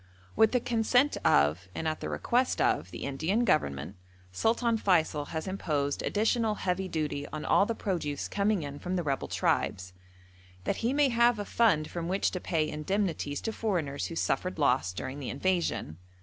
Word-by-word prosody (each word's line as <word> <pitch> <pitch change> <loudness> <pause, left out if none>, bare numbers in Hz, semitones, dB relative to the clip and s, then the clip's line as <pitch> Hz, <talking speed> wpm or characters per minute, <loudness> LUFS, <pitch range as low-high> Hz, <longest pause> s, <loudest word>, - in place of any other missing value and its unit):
With 220 -1 +5
the 250 - +3
consent 245 +4 +2
of, 75 +5 +3
and 160 - -2
at 155 0 -1
the - - -4
request 250 +2 0
of, - - +1
the - - -7
Indian 160 - 0
Government, 75 - 0 0.3
Sultan 230 - +1
Feysul 160 -7 +2
has 160 -1 -4
imposed 150 -7 -1
additional 220 +1 +1
heavy 190 -1 -1
duty 150 -4 -3
on 155 - -6
all 200 - +4
the 230 - -1
produce 165 -10 -2
coming 200 -3 0
in 145 0 -6
from 180 +1 -3
the 175 - 0
rebel 140 -3 -1
tribes, 90 -1 -1 0.7
that 195 - -1
he 235 +2 0
may 285 0 +3
have 235 0 +4
a 205 - -4
fund 190 -12 +2
from 170 -1 -4
which 190 +2 +1
to 180 - -3
pay 160 -4 0
indemnities 155 -2 -2
to 225 - -3
foreigners 170 -12 -2
who 165 - -7
suffered 185 +2 -1
loss 130 - +2
during 130 +9 -6
the 140 - -5
invasion. 170 - -1
175 Hz, 180 wpm, -29 LUFS, 145-215 Hz, 0.7 s, With